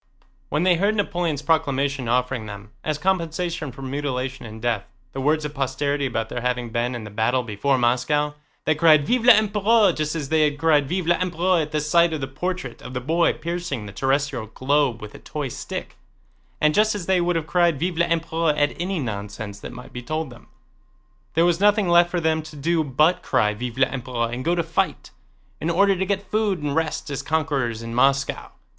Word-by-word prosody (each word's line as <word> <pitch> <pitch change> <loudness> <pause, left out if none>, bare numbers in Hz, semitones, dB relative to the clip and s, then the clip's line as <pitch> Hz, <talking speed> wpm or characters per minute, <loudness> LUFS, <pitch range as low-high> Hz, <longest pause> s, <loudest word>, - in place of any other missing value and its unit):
When 150 +3 0
they 180 -2 +4
heard 200 +4 +2
Napoleon's 175 -7 -1
proclamation 140 -5 0
offering 125 -2 0
them, 105 +1 -9
as 155 -1 -1
compensation 170 -2 -1
for 135 +3 -10
mutilation 135 -2 -3
and 110 +1 -9
death, 115 -3 -1 0.3
the 135 - -4
words 150 +2 +1
of 150 - -5
posterity 140 +1 -1
about 115 -3 -2
their 120 - -4
having 125 -1 -2
been 120 +2 -1
in 120 - -6
the 105 - -9
battle 115 +5 +1
before 115 +5 0
Moscow, 130 +5 +1 0.3
they 155 - +3
cried 155 -1 +5
"Vive 245 +6 +1
l'Empereur!" 215 -2 +5
just 155 0 -2
as 145 -4 -4
they 160 -1 +3
had 145 -1 -1
cried 150 -2 +3
"Vive 180 0 -1
l'Empereur!" 175 0 +2
at 150 -1 -4
the 155 - 0
sight 165 +3 +3
of 155 - -2
the - - -1
portrait 155 -1 -4
of 125 - -9
the - - 0
boy 165 +7 +2
piercing 160 -7 -4
the 100 - -8
terrestrial 135 -1 0
globe 130 -1 0
with 105 - -9
a - - -11
toy 145 -3 -5
stick, - - -6 0.6
and 150 0 +3
just 215 +3 +3
as 195 -4 -4
they 185 -1 +2
would 175 0 +1
have 165 -2 -1
cried 170 -2 +2
"Vive 175 +1 -2
l'Empereur!" 165 -2 +1
at 145 0 +2
any 190 +2 -1
nonsense 105 -4 -5
that - - -8
might 125 0 -11
be 125 - -5
told 155 +2 -3
them. 120 - -15 0.9
There 165 +1 +4
was 175 -1 +2
nothing 205 -1 +4
left 175 0 +5
for 175 - -1
them 160 -1 +1
to 155 0 -11
do 160 +3 +1
but 150 +5 +2
cry 105 0 +1
"Vive 120 +3 -6
l'Empereur!" 125 -3 -1
and 125 +1 -4
go 170 +4 +1
to 170 - 0
fight, 165 0 -2 0.5
in 160 - -2
order 195 +3 +4
to 190 +1 -2
get 200 0 -2
food 215 -3 +1
and 145 -1 -1
rest 160 -2 -1
as 140 0 -3
conquerors 140 -7 -1
in 115 0 -6
Moscow. 135 +3 +1
150 Hz, 205 wpm, -23 LUFS, 125-170 Hz, 0.9 s, cried